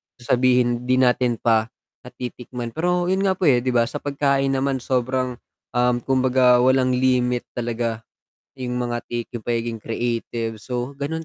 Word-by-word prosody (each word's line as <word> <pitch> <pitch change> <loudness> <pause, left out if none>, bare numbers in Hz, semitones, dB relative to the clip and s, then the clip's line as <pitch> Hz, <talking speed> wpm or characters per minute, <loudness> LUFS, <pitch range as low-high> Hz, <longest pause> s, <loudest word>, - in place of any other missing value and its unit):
sasabihin 125 0 +1
di 130 - +3
natin 125 -1 +3
pa, 110 -1 +2 0.4
natitikman. 125 -1 -7
Pero 180 +3 0
'yun 190 - +1
nga 190 - +2
po, 190 - -5
eh, 120 - +3
di 125 0 -2
ba, 120 - +5
sa - - -4
pagkain 140 -1 +1
naman, 135 0 0
sobrang, 130 0 -1 0.4
um, 125 0 +3
kumbaga, 130 -1 +3
walang 130 -1 +3
limit 125 -1 +1
talaga, 115 -2 -2 0.6
'yung 125 -1 -3
mga 120 -1 -2
take, 120 -1 -4
'yung 120 -3 -7
pagiging 115 -1 -2
creative, 115 -1 -3
so 125 +4 -4
gano'n 160 +3 -3
125 Hz, 155 wpm, -22 LUFS, 120-130 Hz, 0.6 s, ba